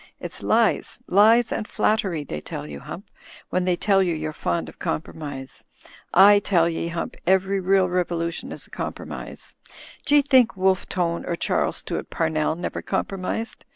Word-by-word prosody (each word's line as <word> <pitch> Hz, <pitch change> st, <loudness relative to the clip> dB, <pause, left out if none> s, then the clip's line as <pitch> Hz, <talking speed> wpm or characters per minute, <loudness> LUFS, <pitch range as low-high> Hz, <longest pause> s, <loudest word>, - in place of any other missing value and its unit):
It's -, -, -5 dB
lies, -, -, +1 dB
lies 220 Hz, +5 st, +5 dB
and 215 Hz, -, -2 dB
flattery 195 Hz, -8 st, 0 dB
they 75 Hz, -, -6 dB
tell -, -, -6 dB
you, 75 Hz, -1 st, -8 dB
Hump, -, -, -9 dB, 0.4 s
when 185 Hz, 0 st, +1 dB
they 180 Hz, -1 st, +2 dB
tell 195 Hz, +2 st, +3 dB
you 175 Hz, -3 st, +1 dB
you're 155 Hz, 0 st, -4 dB
fond 85 Hz, -, -2 dB
of 80 Hz, -, -13 dB
compromise. 135 Hz, -, -5 dB, 0.5 s
I 205 Hz, +3 st, +7 dB
tell 175 Hz, -4 st, +2 dB
ye. 165 Hz, 0 st, -2 dB
Hump, 170 Hz, 0 st, -4 dB
everyn*eal 190 Hz, 0 st, +3 dB
revolution 175 Hz, -2 st, -2 dB
is -, -, -6 dB
a -, -, -21 dB
compromise. -, -, -7 dB, 0.5 s
D'ye 290 Hz, 0 st, +5 dB
think 260 Hz, -7 st, +4 dB
Wolfe 190 Hz, 0 st, +1 dB
Tone 170 Hz, -2 st, -1 dB
or 170 Hz, -, -1 dB
Charles -, -, 0 dB
Stuart -, -, -4 dB
Pamell 155 Hz, -1 st, 0 dB
never 175 Hz, -, -4 dB
compromised? 195 Hz, +4 st, -3 dB
180 Hz, 155 wpm, -24 LUFS, 160-195 Hz, 0.5 s, I